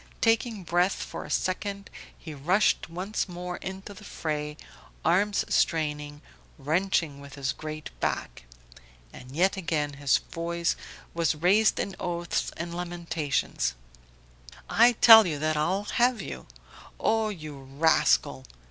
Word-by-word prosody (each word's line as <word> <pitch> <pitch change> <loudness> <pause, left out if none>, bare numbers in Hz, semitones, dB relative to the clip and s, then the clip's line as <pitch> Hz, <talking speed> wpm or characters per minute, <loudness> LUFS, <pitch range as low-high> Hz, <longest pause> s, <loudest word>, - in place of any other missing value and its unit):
Taking 225 -2 +1
breath 175 +3 +2
for - - -7
a - - -10
second 200 +2 -2 0.3
he 160 - -9
rushed 175 +8 +1
once 185 +4 -3
more 180 0 -5
into 190 +2 -7
the 200 - -13
fray, 150 -5 -4 0.5
arms 200 +5 +2
straining, 150 -2 0 0.3
wrenching 160 0 0
with 140 -1 -11
his 140 -1 -2
great 155 - -7
back. - - -3 0.7
And 130 +2 -11
yet 190 +4 +2
again 150 -5 -1
his 140 -2 +4
voice 170 0 -2 0.4
was 165 -2 +1
raised 195 +7 +3
in 195 - -3
oaths 175 -1 -2
and 170 +1 -5
lamentations: 170 - -2 0.9
"I 240 +2 +5
tell 220 -2 +9
you 155 -3 -2
that 155 +1 0
I'll 180 +7 0
have 240 +2 +2
you... 65 - -7 0.5
Oh 220 -1 +1
you 155 -8 -7
rascal! 135 - +2
170 Hz, 130 wpm, -27 LUFS, 150-195 Hz, 0.9 s, tell